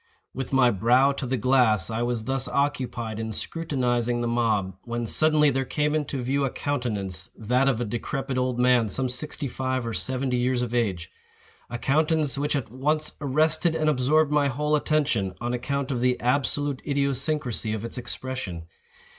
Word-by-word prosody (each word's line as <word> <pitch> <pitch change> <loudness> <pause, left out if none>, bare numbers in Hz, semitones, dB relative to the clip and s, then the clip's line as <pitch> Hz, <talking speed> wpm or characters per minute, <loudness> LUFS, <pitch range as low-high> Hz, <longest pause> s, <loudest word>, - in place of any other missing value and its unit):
With 135 0 -5
my 130 -3 +5
brow 120 +7 +4
to 140 -1 -4
the 130 +1 0
glass, 115 -6 +3
I 110 +1 -2
was 120 -2 -1
thus 135 +2 -1
occupied 125 -6 -1
in 110 0 -3
scrutinizing 125 -4 -1
the 120 - -1
mob, 110 -5 0
when 120 0 -4
suddenly 150 +4 +4
there 135 0 0
came 150 +3 -1
into 145 -4 -2
view 140 +3 0
a 135 - +1
countenance 105 -11 -3
(that 125 +5 +1
of 130 -4 +2
a 120 - -1
decrepid 130 +4 -3
old 125 -1 0
man, 125 -3 +3
some 130 +5 0
sixty 140 +3 -2
five 130 -1 -2
or 115 - -3
seventy 130 0 -1
years 125 0 +1
of 120 -1 -4
age,)—a 105 +1 -5
countenance 150 +2 +1
which 145 +2 -1
at 130 -6 -3
once 150 +4 0
arrested 155 +4 +2
and 155 -1 +2
absorbed 150 +3 +2
my 150 -1 +3
whole 150 +3 0
attention, 145 -11 0
on 120 +1 -2
account 140 +2 -2
of 125 -3 -1
the 125 0 +2
absolute 140 +2 0
idiosyncrasy 140 -4 0
of 110 +1 -3
its 115 - -4
expression. 125 -10 -5
130 Hz, 170 wpm, -25 LUFS, 120-140 Hz, -, my